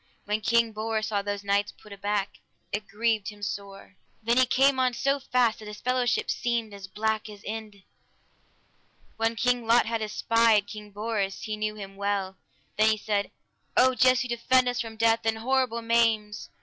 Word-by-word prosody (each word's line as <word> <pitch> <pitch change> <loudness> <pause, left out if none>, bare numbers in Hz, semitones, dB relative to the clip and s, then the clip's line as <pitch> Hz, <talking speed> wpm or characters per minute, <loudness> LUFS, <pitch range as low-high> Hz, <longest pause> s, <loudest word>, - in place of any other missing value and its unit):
When 210 +1 -1
King 235 +1 +2
Bors 220 0 -2
saw 205 -2 0
those 205 0 -4
knights 200 +1 +1
put 210 - -14
aback, 200 0 -2 0.3
it 205 +1 -3
grieved 220 -1 0
him 205 -1 -12
sore; 200 -1 -6 0.3
then 235 +2 +2
he 255 0 +5
came 270 +2 +3
on 255 -1 +2
so 275 +3 +1
fast 250 -4 +1
that 215 - -10
his 210 0 -8
fellowship 250 -1 0
seemed 235 -3 -2
as 200 -1 -9
black 220 +2 -2
as 205 -1 -12
Inde. 210 -2 -7 1.3
When 225 +1 0
King 245 0 0
Lot 235 +1 +5
had 230 0 -2
espied 215 0 +2
King 210 0 -9
Bors, 205 -1 -3
he 215 - -3
knew 215 0 -3
him 195 -2 -9
well, 200 -1 -2 0.4
then 215 +1 +6
he 220 - +2
said, 205 -1 -1 0.5
O 260 0 +5
Jesu, 255 0 +3
defend 250 +2 +2
us 245 -1 0
from 225 -1 -7
death 225 0 +3
and 225 0 0
horrible 245 -1 0
maims! 225 -2 +1
220 Hz, 175 wpm, -27 LUFS, 205-235 Hz, 1.3 s, then